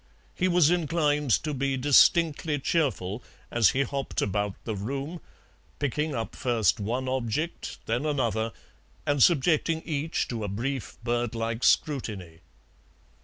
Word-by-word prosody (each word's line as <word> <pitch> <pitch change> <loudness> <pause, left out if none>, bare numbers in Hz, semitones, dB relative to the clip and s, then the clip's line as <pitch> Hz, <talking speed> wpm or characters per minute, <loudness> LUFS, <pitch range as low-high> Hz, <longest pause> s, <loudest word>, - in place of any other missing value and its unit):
He 185 - 0
was 175 -3 +4
inclined 150 -4 +1
to 150 -1 -2
be 135 0 -1
distinctly 150 +3 +4
cheerful 125 - -1 0.3
as 115 -5 +4
he 135 - +1
hopped 140 0 -3
about 105 0 -1
the 110 - -3
room, 140 - -4 0.6
picking 150 +1 -1
up 115 -1 -4
first 115 - +1
one 120 +6 -2
object, 130 +5 -2
then 120 +7 -1
another, 115 -6 0 0.5
and 145 -1 +1
subjecting 160 +1 +3
each 155 0 -1
to 115 -3 -3
a - - -2
brief 125 +6 -4
bird 120 -1 -1
like 115 +1 -3
scrutiny. 105 - 0
135 Hz, 130 wpm, -27 LUFS, 115-150 Hz, 0.6 s, was